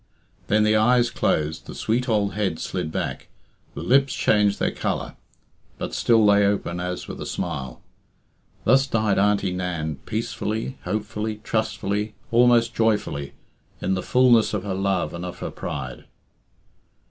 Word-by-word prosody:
Then 105 +1 +3
the 105 0 +3
eyes 120 +2 +4
closed, 80 +1 -1
the - - -8
sweet 120 +3 -1
old 105 -3 +1
head 95 -6 -1
slid 80 - -3
back, - - -4 0.5
the - - -5
lips 135 +1 +3
changed 105 -1 +2
their - - +1
colour, - - -3 0.6
but - - -5
still 115 -2 +4
lay 100 0 +5
open 100 -3 0
as 90 0 -4
with - - -7
a - - -4
smile. 70 -8 -4 0.8
Thus 135 +4 +4
died 110 -6 +1
Auntie 100 -2 +2
Nan, 85 -5 -3
peacefully, 110 +2 -3
hopefully, 105 +2 -3
trustfully, 105 -1 -1 0.2
almost 120 0 +4
joyfully, 105 -12 0 0.5
in 95 - 0
the 95 - -1
fulness 120 -3 +4
of 95 - -2
her 100 -2 -3
love 95 -4 0
and 85 +1 -6
of 90 0 -6
her - - -5
pride. 70 -3 -6
105 Hz, 145 wpm, -24 LUFS, 90-110 Hz, 0.8 s, lay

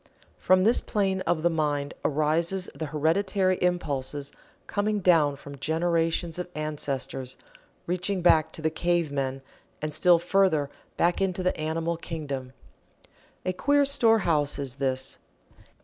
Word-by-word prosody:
From 185 0 +4
this 225 +5 +4
plane 195 -2 0
of 160 -2 +1
the 175 - +4
mind 145 -3 -1
arise 165 +5 0
the 160 - -5
hereditary 185 +5 +1
impulses 145 -6 -1 0.3
coming 210 0 0
down 165 -6 +4
from 140 0 -11
generations 165 +2 0
of 180 - -4
ancestors, 135 -4 -3 0.5
reaching 180 +1 -1
back 160 -3 +4
to 160 - -6
the 160 - +1
cavemen, 145 -6 -1 0.4
and 155 0 -4
still 175 +3 +5
further 170 -5 +2 0.3
back 175 +2 +2
into 185 -1 0
the 185 - +1
animal 160 +2 -2
kingdom. 140 -6 -5 0.9
A 185 - 0
queer 285 +8 +3
storehouse 210 - +2
is 140 -2 -5
this. 130 -1 -2
165 Hz, 130 wpm, -27 LUFS, 145-185 Hz, 0.9 s, still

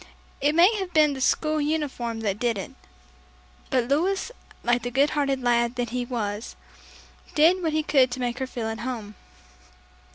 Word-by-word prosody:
It 295 +2 +2
may 360 +7 +6
have 380 -3 -4
been 305 -2 +4
the 265 - -6
school 310 +3 +1
uniform 280 -7 -2
that 205 -2 -2
did 235 -3 0
it. 195 - -6 1.0
But 250 -3 +1
Louis, 370 - 0 0.3
like 240 0 +2
the 245 - -3
good 275 +4 +2
hearted 275 -3 0
lad 235 0 +2
that 245 -2 -3
he 250 0 -2
was, 215 -3 -4 0.8
did 340 +4 +5
what 320 -3 -1
he 310 0 +1
could 270 -4 +4
to 250 +1 -5
make 245 0 -2
her 260 - -2
feel 240 -3 -5
at 225 0 -4
home. 230 -4 -5
255 Hz, 175 wpm, -25 LUFS, 235-305 Hz, 1.0 s, may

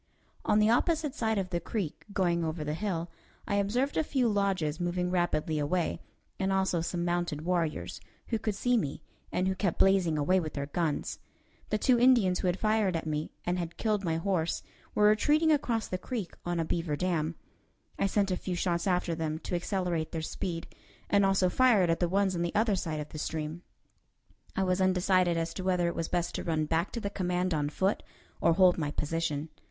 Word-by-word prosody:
On 210 - +3
the 215 +1 +4
opposite 305 +3 +1
side 220 -6 0
of 185 -2 -2
the 175 - 0
creek, 170 -2 -4
going 175 -4 +1
over 160 -1 -2
the 150 0 -2
hill, 170 -2 -3 0.4
I 200 - +1
observed 240 +8 0
a 315 - +3
few 265 -5 +1
lodges 195 -7 0
moving 180 0 -1
rapidly 160 -3 0
away, 165 +4 0 0.4
and 190 0 +1
also 190 -3 +1
some 170 +1 -2
mounted 175 -3 -1
warriors, 170 -3 -1 0.3
who 225 - 0
could 215 -2 -2
see 245 +4 +2
me, 145 -11 -3 0.3
and 185 - 0
who 190 - +2
kept 190 -2 -1
blazing 190 -5 +3
away 180 +6 +3
with 155 -3 -4
their 140 -1 -2
guns. 155 0 -2 0.5
The 215 - +1
two 245 +2 +3
Indians 235 -8 +5
who - - -1
had 180 +1 +1
fired 215 -4 +1
at 165 - -2
me, 155 0 -2 0.2
and 180 +1 0
had 170 -1 -5
killed 210 -3 0
my 165 -3 0
horse, 170 -2 -1 0.3
were 210 - +5
retreating 300 +9 +3
across 240 -7 +1
the 185 - -3
creek 215 -5 -4
on 175 -1 0
a 165 - 0
beaver 165 -2 -1
dam. 165 -1 -1 0.6
I 200 - +3
sent 195 -1 +1
a 180 - 0
few 180 0 -3
shots 175 0 0
after 180 -2 +1
them 160 -1 -2
to - - -5
accelerate 175 -3 -1
their 160 -1 -3
speed, 165 +1 -4 0.5
and 200 0 +5
also 195 -1 +3
fired 205 -4 +4
at 165 - 0
the 175 - +1
ones 195 0 +2
on 170 - -1
the 170 0 -2
other 215 -1 +3
side 160 -4 -3
of 150 - -7
the 155 - -7
stream. 160 +2 -3 0.9
I 195 - +1
was 185 0 +1
undecided 185 -2 +3
as 165 0 -2
to 185 - -5
whether 180 -2 +1
it 170 - -1
was 165 - -2
best 175 -1 -1
to - - -3
run 155 -2 0
back 165 +2 0
to 235 - -2
the 200 -2 -3
command 180 -1 0
on 145 -2 0
foot 190 +6 0 0.4
or 170 - +4
hold 180 0 +5
my 150 -2 -1
position. 150 0 -2
180 Hz, 210 wpm, -30 LUFS, 165-200 Hz, 0.9 s, Indians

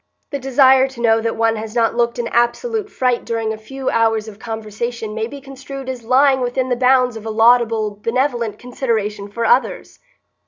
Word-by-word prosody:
The 280 - -3
desire 265 0 +4
to 265 -2 -13
know 225 -1 +3
that 230 0 -2
one 225 0 +1
has 215 +1 -7
not 230 -1 +2
looked 235 0 0
an 240 -1 -2
absolute 415 - 0
fright 250 -8 0
during 225 -2 -2
a - - -4
few 265 +4 -4
hours 225 -1 +1
of 210 -1 -11
conversation 220 0 -5
may 220 +1 -2
be 280 +4 -9
construed 275 0 -9
as 255 -2 -5
lying 265 +3 +3
within 255 +1 -1
the 245 - +1
bounds 250 -1 +3
of 220 - -8
a - - -2
laudable 225 -2 +3
benevolent 235 -3 -1
consideration 220 -5 -3
for 230 +3 -3
others. 250 +4 0
235 Hz, 190 wpm, -19 LUFS, 225-260 Hz, -, desire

